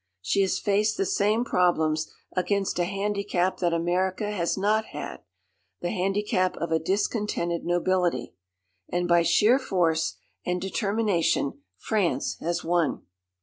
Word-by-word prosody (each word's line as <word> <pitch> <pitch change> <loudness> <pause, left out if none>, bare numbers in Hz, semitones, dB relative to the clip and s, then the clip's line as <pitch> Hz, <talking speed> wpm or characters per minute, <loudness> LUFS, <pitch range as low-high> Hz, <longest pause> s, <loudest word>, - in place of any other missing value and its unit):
She 105 - +1
has 190 -2 +1
faced 210 +1 +1
the 195 - +1
same 210 +5 +1
problems 160 -6 +1 0.2
against 190 0 0
a 175 - +2
handicap 195 -1 -1
that 175 -2 +1
America 185 +4 0
has 175 -4 -1
not 215 +3 +2
had - - -6 0.6
the 175 - -2
handicap 195 -1 0
of 165 +1 -3
a 160 - +3
discontented 190 -1 -1
nobility. 175 - 0 0.6
And 175 0 0
by 170 0 +5
sheer 220 +9 +4
force 170 -9 +1 0.3
and 180 0 -1
determination 195 -6 0 0.2
France 205 -6 0
has 170 +1 -2
won. 170 -2 0
185 Hz, 130 wpm, -26 LUFS, 170-205 Hz, 0.6 s, by